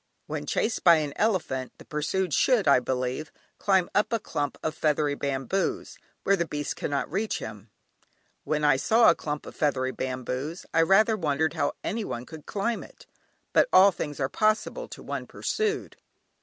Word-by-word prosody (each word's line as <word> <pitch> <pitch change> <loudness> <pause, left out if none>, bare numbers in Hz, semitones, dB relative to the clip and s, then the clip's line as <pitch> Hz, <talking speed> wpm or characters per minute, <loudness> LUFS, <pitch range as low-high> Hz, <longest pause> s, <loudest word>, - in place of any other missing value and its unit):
When - - -5
chased 225 - 0
by 170 -2 +8
an 150 -3 -1
elephant 170 - 0
the - - -14
pursued 160 +3 -1
should, 245 -9 +3
I 140 -2 +6
believe, 130 +4 -3 0.3
climb 190 -3 +3
up 205 - +2
a 230 - +2
clump 145 -7 -3
of 155 - -1
feathery 150 -2 +1
bamboos, 140 +6 -2 0.2
where 200 - +4
the 170 -3 -1
beast 145 -1 -3
cannot 140 -1 -2
reach 205 +5 -1
him. 105 0 -8 0.7
When 150 -1 -1
I 145 -2 +5
saw 225 - +5
a - - 0
clump 150 -1 -4
of - - -10
feathery 130 -3 0
bamboos 130 +6 -4
I 165 - +4
rather 215 +6 +4
wondered 160 -4 0
how 145 -3 0
anyone 200 - -3
could 155 +1 -11
climb 210 +3 -1
it; - - -14 0.5
but - - +4
all 195 +2 +7
things 150 -5 -5
are 135 - +1
possible 215 - 0
to - - -10
one - - -5
pursued. 430 -1 -2
155 Hz, 170 wpm, -27 LUFS, 140-195 Hz, 0.7 s, by